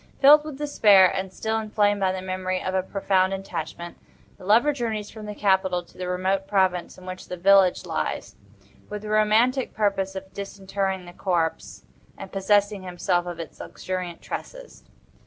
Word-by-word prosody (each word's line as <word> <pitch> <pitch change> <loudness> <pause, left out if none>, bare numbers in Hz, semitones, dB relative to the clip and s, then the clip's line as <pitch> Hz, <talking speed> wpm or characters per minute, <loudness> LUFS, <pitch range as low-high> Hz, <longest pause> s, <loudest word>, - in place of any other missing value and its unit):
Filled 295 +2 +8
with 305 -3 -7
despair, 205 -11 +5
and 190 -1 -3
still 220 +4 -2
inflamed 205 -1 +1
by 190 -1 +2
the 185 0 -5
memory 185 0 -2
of 185 - -3
a 190 - +2
profound 190 0 +1
attachment, 170 -2 -6 0.4
the - - -13
lover 230 +10 +4
journeys 220 -5 -3
from 215 -1 -9
the 210 - -6
capital 190 -3 +1
to - - -23
the 180 0 -5
remote 190 +2 -1
province 185 -3 0
in 185 - -13
which 185 0 -8
the 180 - -6
village 190 0 +4
lies, - - -3 0.5
with 210 0 -6
the 210 - -6
romantic 220 +5 +2
purpose 195 -2 0
of 190 0 -8
disinterring 195 -1 -3
the 175 - -11
corpse, 175 -4 -2 0.3
and - - -9
possessing 205 +1 +2
himself 180 -1 -1
of 175 -1 -6
its 165 - -8
luxuriant 185 -2 -6
tresses. - - -8
195 Hz, 170 wpm, -24 LUFS, 185-210 Hz, 0.5 s, Filled